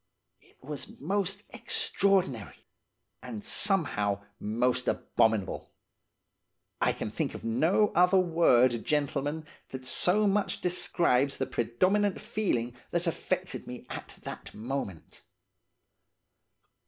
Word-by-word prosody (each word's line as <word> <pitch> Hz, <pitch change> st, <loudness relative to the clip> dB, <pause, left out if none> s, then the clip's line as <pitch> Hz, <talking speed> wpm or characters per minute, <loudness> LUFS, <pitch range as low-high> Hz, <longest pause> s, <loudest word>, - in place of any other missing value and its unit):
It -, -, -25 dB
was 145 Hz, 0 st, -7 dB
most 195 Hz, +5 st, -1 dB
extraordinary, 135 Hz, -, 0 dB, 0.6 s
and 115 Hz, -5 st, -7 dB
somehow 105 Hz, -, 0 dB, 0.2 s
most 125 Hz, +4 st, 0 dB
abominable. 110 Hz, -4 st, 0 dB, 1.1 s
I -, -, +4 dB
can -, -, -4 dB
think -, -, -2 dB
of -, -, -8 dB
no 160 Hz, -, +3 dB
other 180 Hz, +2 st, +4 dB
word, 130 Hz, -10 st, +4 dB
gentlemen, 145 Hz, +1 st, -1 dB, 0.2 s
that 130 Hz, -1 st, -7 dB
so 185 Hz, +10 st, +2 dB
much 205 Hz, 0 st, +1 dB
describes 145 Hz, -6 st, +1 dB
the 130 Hz, -, 0 dB
predominant 185 Hz, -, +1 dB
feeling 125 Hz, -, -1 dB
that 175 Hz, +1 st, -1 dB
affected 185 Hz, +2 st, -2 dB
me 125 Hz, 0 st, -8 dB
at -, -, -7 dB
the -, -, -8 dB
moment. 110 Hz, -, -5 dB
145 Hz, 105 wpm, -29 LUFS, 120-185 Hz, 1.1 s, I